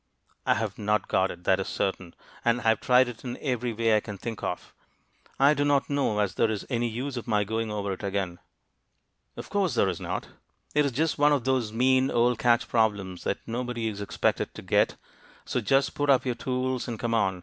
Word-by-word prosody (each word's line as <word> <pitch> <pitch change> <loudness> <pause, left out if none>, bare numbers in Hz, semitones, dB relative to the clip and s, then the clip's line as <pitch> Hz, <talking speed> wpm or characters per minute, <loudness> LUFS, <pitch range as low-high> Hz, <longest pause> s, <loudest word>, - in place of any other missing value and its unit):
"I - - +4
have 110 -2 -3
not 105 -1 0
got 95 0 +2
it, 85 - -9
that 95 +1 +3
is 95 - -3
certain; 95 -3 -3 0.3
and 120 +1 +2
I 115 - +2
have 110 - +3
tried 125 0 +5
it 120 -2 -8
in 125 -2 -5
every 125 -3 -1
way 115 0 +2
I - - +4
can 105 -1 -8
think 115 +2 -6
of. 90 - -4 0.7
I 140 +2 +6
do 145 0 0
not 145 0 +2
know 140 -7 +1
as 105 -2 +1
there 115 - +2
is 105 -3 -3
any 120 -1 +1
use 125 +4 -4
of 120 - -6
my 105 -2 +2
going 110 +2 -2
over 100 -2 -2
it 95 - -8
again." 95 -3 -2 1.0
"Of - - -8
course 195 -9 +1
there 100 - +3
is 90 - -3
not! - - -4 0.4
It 150 -1 +3
is - - -2
just 155 +5 0
one 145 0 +5
of 140 -4 +1
those 130 -4 0
mean 130 +3 +3
old 120 0 +2
catch 120 -1 +3
problems 100 -6 0
that - - -1
nobody 120 -1 -2
is 105 -1 -6
expected 100 - -1
to - - -8
get - - +2 0.5
So 125 - -1
just 135 +5 +2
put 145 0 -1
up 135 -2 +4
your 125 - 0
tools, 130 +1 -2
and 115 -2 -4
come 115 -1 -1
on. 95 -5 +1
115 Hz, 225 wpm, -27 LUFS, 105-130 Hz, 1.0 s, I